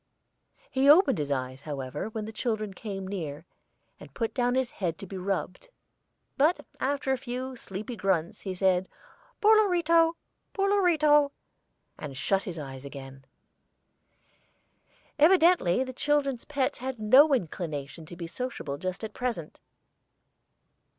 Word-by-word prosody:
He 270 +2 +3
opened 325 - +6
his 145 -1 -2
eyes, 130 -1 -3
however, 145 +4 -5
when 220 -1 -5
the 220 - -6
children 215 -3 -2
came 195 -2 -6
near, 160 -7 -5 0.5
and - - -13
put 230 -2 -2
down 245 -1 +1
his 260 -2 0
head 170 -5 -3
to - - -8
be 195 - -9
rubbed, 190 - -3 0.7
but 310 +6 +3 0.2
after 275 0 -1
a 265 - 0
few 255 +1 -5
sleepy 215 +2 -7
grunts 190 -6 -1
he 190 -2 -4
said, 185 0 +2 0.5
"Poor 435 +1 +7
Lorito, 335 -5 +3 0.4
poor 395 0 +1
Lorito," 305 -7 +4 0.7
and 140 -3 -7
shut 195 +7 0
his 180 -3 -5
eyes 135 -3 -7
again. 135 -1 -10 1.9
Evidently 325 - +5
the 255 0 -7
children's 275 -2 0
pets 280 -3 -1
had 260 0 -4
no 260 +8 +6
inclination 160 - -5
to 175 - -9
be 170 0 -6
sociable 165 - -5
just 185 +3 -4
at 220 - -5
present. 235 -11 -4
215 Hz, 135 wpm, -28 LUFS, 170-275 Hz, 1.9 s, Poor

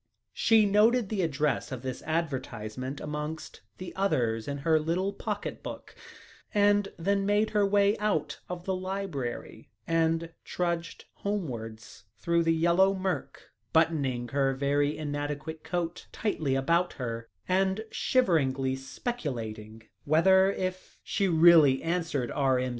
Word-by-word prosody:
She 220 -1 +4
noted 210 +2 +3
the 210 -3 -1
address 150 -2 0
of 130 -1 -6
this 130 -1 -4
advertisement 130 -5 -3
amongst 150 +1 -5 0.2
the 185 - -8
others 120 - 0
in 140 0 -3
her 160 -1 +4
little 175 +6 -1
pocket - - -4
book, - - -8 0.6
and 205 0 +4
then 195 +3 +1
made 205 +2 +2
her 210 -1 +2
way 200 +1 +3
out 155 -9 -1
of 180 0 -6
the 190 - 0
library 185 -9 -5 0.2
and 165 0 0
trudged 170 -1 -3
homewards 115 - -5
through 170 0 +1
the 165 0 +2
yellow 175 +4 +3
murk, 190 -1 -4 0.2
buttoning 140 -7 +1
her 135 +1 +1
very 145 +2 +1
inadequate 150 +1 -4
coat 175 -1 -3
tightly 155 -11 -1
about 170 +7 +1
her 115 -3 -5 0.2
and 190 +3 +1
shiveringly 135 - +1
speculating 115 - -5 0.2
whether, 190 +6 +5
if 185 -1 -5
she 200 - 0
really 160 -5 +6
answered 165 -7 -1
R.M.' 130 -3 +1
165 Hz, 125 wpm, -28 LUFS, 135-190 Hz, 0.6 s, really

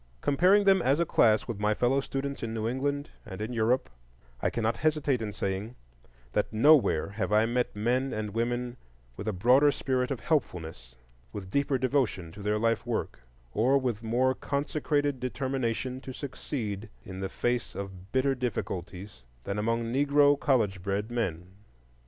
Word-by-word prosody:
Comparing 180 +8 +4
them 195 -2 +5
as 140 +2 +2
a 170 - +3
class 110 -8 +3
with 115 -4 -4
my 105 0 +1
fellow 130 +4 +2
students 140 +1 -4
in 115 -1 -3
New 110 0 -1
England 140 +4 -2
and 95 -4 -8
in 110 +3 -4
Europe, 120 +3 +1 0.5
I - - +2
cannot 115 -1 -1
hesitate 150 -5 +1
in 105 -2 -3
saying 100 +3 -3 0.6
that - - 0
nowhere 120 - +4
have 100 -1 -3
I 105 +1 +4
met 120 0 -1
men 125 +5 0
and 105 -1 -4
women 120 +2 -2 0.4
with 100 - -7
a - - +2
broader 125 +9 +5
spirit 130 -2 -1
of 130 -5 -3
helpfulness, 80 - -2 0.4
with 95 +3 -7
deeper 140 +1 +1
devotion 125 - 0
to 100 - -11
their 105 +1 0
life 115 +1 +1
work, 115 - -3 0.3
or 130 +6 +3
with 125 -5 -1
more 125 +3 +2
consecrated 145 0 -1
determination 130 -1 -2
to 130 - -7
succeed 115 -6 -5 0.2
in 95 0 -7
the 95 0 -3
face 120 -1 -2
of 95 -1 -8
bitter 135 +1 +2
difficulties 100 -6 -4 0.2
than 100 +7 -3
among 115 +2 0
Negro 145 +1 +4
college 110 -11 +1
bred 100 +4 -2
men. 90 -8 -2
120 Hz, 165 wpm, -29 LUFS, 105-135 Hz, 0.6 s, them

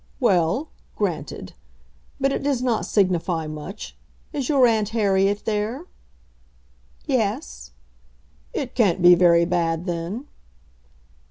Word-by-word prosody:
"Well; 180 - +2 0.3
granted. 155 - -4 0.7
But 275 0 +2
it - - -2
does 275 -3 0
not 240 -4 0
signify 180 -4 +1
much. 155 +6 -8 0.4
Is 275 -4 -3
your 275 -4 +5
aunt 220 -3 +2
Harriet 200 -2 +1
there?" 220 +8 -2 1.2
"Yes." - - -2 0.8
"It 260 -3 -4
can't 190 -7 +2
be 175 0 +9
very 170 -1 +5
bad, 170 -1 0
then." 175 +8 -4
195 Hz, 105 wpm, -23 LUFS, 170-235 Hz, 1.2 s, be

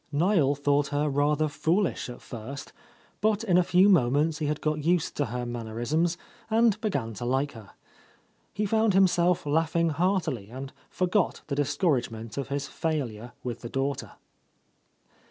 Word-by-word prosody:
Niel 155 -2 +3
thought 145 0 +1
her 145 +1 0
rather 145 +2 +2
foolish 165 +2 0
at 120 - -9
first, 130 +4 -8 0.5
but 215 0 +2
in 190 -6 +2
a 180 - +6
few 180 +3 +4
moments 150 -2 +3
he 150 - -1
had 150 0 -1
got 155 -1 -1
used 170 0 +1
to 145 - 0
her 125 +1 -4
mannerisms 120 +9 -1 0.3
and 220 -1 +3
began 140 - -2
to 105 - -7
like 135 +4 0
her. 110 -5 -13 0.8
He 210 +1 -2
found 220 -1 +2
himself 180 -3 +3
laughing 165 +2 +1
heartily 160 - 0
and 135 +3 -7 0.2
forgot 185 +1 0
the 140 - -1
discouragement 130 - -1
of 140 - -3
his 140 0 -3
failure 125 -8 -3
with 120 -2 -5
the 120 - -6
daughter. 135 +1 -2
145 Hz, 155 wpm, -27 LUFS, 130-175 Hz, 0.8 s, a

